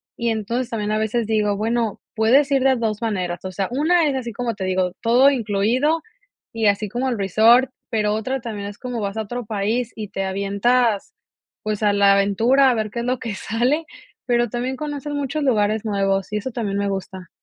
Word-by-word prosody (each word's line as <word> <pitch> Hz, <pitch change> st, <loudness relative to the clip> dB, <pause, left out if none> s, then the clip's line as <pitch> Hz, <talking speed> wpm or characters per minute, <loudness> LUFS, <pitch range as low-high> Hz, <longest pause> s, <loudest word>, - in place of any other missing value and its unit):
y 235 Hz, 0 st, -1 dB
entonces 230 Hz, +3 st, -2 dB
también, 210 Hz, -3 st, -2 dB
a -, -, +1 dB
veces 220 Hz, +1 st, -1 dB
digo, 210 Hz, -2 st, +1 dB
bueno 225 Hz, 0 st, -1 dB, 0.2 s
puedes 255 Hz, +6 st, +4 dB
ir 270 Hz, -1 st, +3 dB
de 265 Hz, -1 st, +4 dB
2 220 Hz, -2 st, -2 dB
maneras, 185 Hz, -6 st, -2 dB
o 185 Hz, -, -5 dB
sea, 190 Hz, +1 st, -2 dB
1 315 Hz, +5 st, +2 dB
es 275 Hz, -, 0 dB
así 240 Hz, -3 st, -3 dB
como 235 Hz, 0 st, -3 dB
te 195 Hz, -, -5 dB
digo, 185 Hz, -1 st, 0 dB
todo 245 Hz, +4 st, +5 dB
incluido 250 Hz, +6 st, +1 dB, 0.5 s
y 225 Hz, -2 st, +1 dB
así 205 Hz, +1 st, +1 dB
como 255 Hz, +5 st, -1 dB
el 235 Hz, -, -2 dB
resort, 225 Hz, +7 st, +5 dB, 0.2 s
pero, 210 Hz, -2 st, +1 dB
otra 255 Hz, +5 st, -2 dB
también 210 Hz, -4 st, -5 dB
es 205 Hz, -, -11 dB
como 250 Hz, -3 st, -5 dB
vas 200 Hz, +1 st, -3 dB
a 220 Hz, -, -1 dB
otro 240 Hz, +2 st, -5 dB
país 220 Hz, +3 st, -1 dB
y 215 Hz, -2 st, -5 dB
te 195 Hz, -, -3 dB
avientas, 200 Hz, -, +1 dB, 0.5 s
pues, 215 Hz, 0 st, -2 dB
a 205 Hz, -1 st, +3 dB
la 200 Hz, -1 st, +5 dB
aventura 225 Hz, +8 st, +4 dB
a -, -, +3 dB
ver 215 Hz, -2 st, -2 dB
qué 235 Hz, -, -4 dB
es 235 Hz, -, -3 dB
lo 255 Hz, 0 st, 0 dB
que 220 Hz, -3 st, -4 dB
sale, 250 Hz, +11 st, 0 dB, 0.4 s
pero, 240 Hz, -2 st, +1 dB
también 250 Hz, +3 st, -3 dB
conocer 295 Hz, 0 st, -5 dB
muchos 285 Hz, +1 st, -2 dB
lugares 215 Hz, -4 st, +1 dB
nuevos 195 Hz, -1 st, 0 dB
y -, -, +1 dB
eso 255 Hz, +5 st, -4 dB
también 210 Hz, -4 st, -2 dB
me 200 Hz, 0 st, 0 dB
gusta. 190 Hz, -2 st, -5 dB
225 Hz, 210 wpm, -21 LUFS, 205-250 Hz, 0.5 s, todo